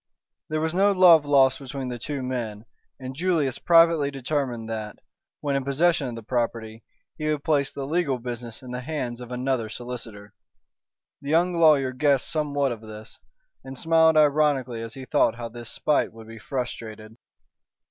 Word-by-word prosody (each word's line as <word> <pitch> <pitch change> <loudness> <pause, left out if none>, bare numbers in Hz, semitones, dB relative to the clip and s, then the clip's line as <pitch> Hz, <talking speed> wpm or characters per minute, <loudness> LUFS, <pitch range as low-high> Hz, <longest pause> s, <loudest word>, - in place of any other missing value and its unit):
There 155 0 -1
was 160 +1 -1
no 195 +3 +4
love 175 -5 +6
lost 135 -2 +4
between 135 -1 -6
the 120 -1 -5
two 140 +2 -4
men, 115 -4 -4 0.3
and 130 0 -7
Julius 160 -5 0
privately 165 -4 +4
determined 135 -4 -3
that, 110 -2 -5 0.4
when 140 -1 -1
in 135 - 0
possession 145 +2 +1
of 120 - -5
the 115 - -8
property, 115 -1 -3 0.4
he 155 0 -1
would 150 -2 -1
place 145 -4 +1
the 140 - -5
legal 150 -3 0
business 120 -1 -7
in 125 - -9
the 125 0 -4
hands 125 -4 -4
of 125 0 -9
another 125 -2 -1
solicitor. 115 -3 -8 0.9
The 140 - -7
young 175 +3 +3
lawyer 150 -6 +4
guessed 135 +1 +1
somewhat 145 -3 0
of 115 -2 -6
this, 110 -1 -11 0.4
and 135 0 -9
smiled 160 +1 +4
ironically 145 -5 +2
as 115 -1 -7
he 135 -1 -8
thought 115 - +2
how 115 0 -6
this 120 0 -9
spite 150 -1 0
would 110 0 -13
be 115 0 -10
frustrated. 110 -4 -6
130 Hz, 170 wpm, -25 LUFS, 120-150 Hz, 0.9 s, love